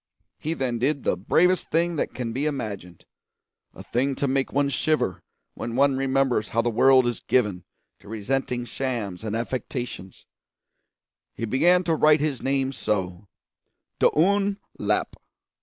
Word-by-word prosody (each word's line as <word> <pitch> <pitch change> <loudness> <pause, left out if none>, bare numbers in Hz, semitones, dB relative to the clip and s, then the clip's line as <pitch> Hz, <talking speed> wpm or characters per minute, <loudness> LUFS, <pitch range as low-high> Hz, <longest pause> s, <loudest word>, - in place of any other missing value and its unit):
He 160 +2 -2
then 125 -5 -2
did 140 +2 0
the - - +1
bravest 180 - +2
thing 170 +1 +1
that - - -2
can 120 -3 -3
be 140 +5 -1
imagined 100 - -5 0.7
a - - -10
thing 135 +3 0
to 140 - -1
make 135 0 0
one 140 +1 +1
shiver 145 -6 0 0.3
when 115 0 -5
one 140 +1 +3
remembers 135 -4 +1
how 115 +1 +1
the 120 - 0
world 130 +3 +5
is 120 -2 -1
given 105 -8 0 0.3
to - - -18
resenting 120 +3 -2
shams 115 -7 -4
and 110 -1 -3
affectations; 120 -4 -5 1.1
he 115 - -3
began 170 - +3
to 170 - +1
write 155 -1 +5
his 145 -3 -1
name 135 0 0
so: 95 -6 -3 0.7
d'Un 200 +4 +3 0.2
Lap. - - -1
130 Hz, 145 wpm, -25 LUFS, 115-145 Hz, 1.1 s, world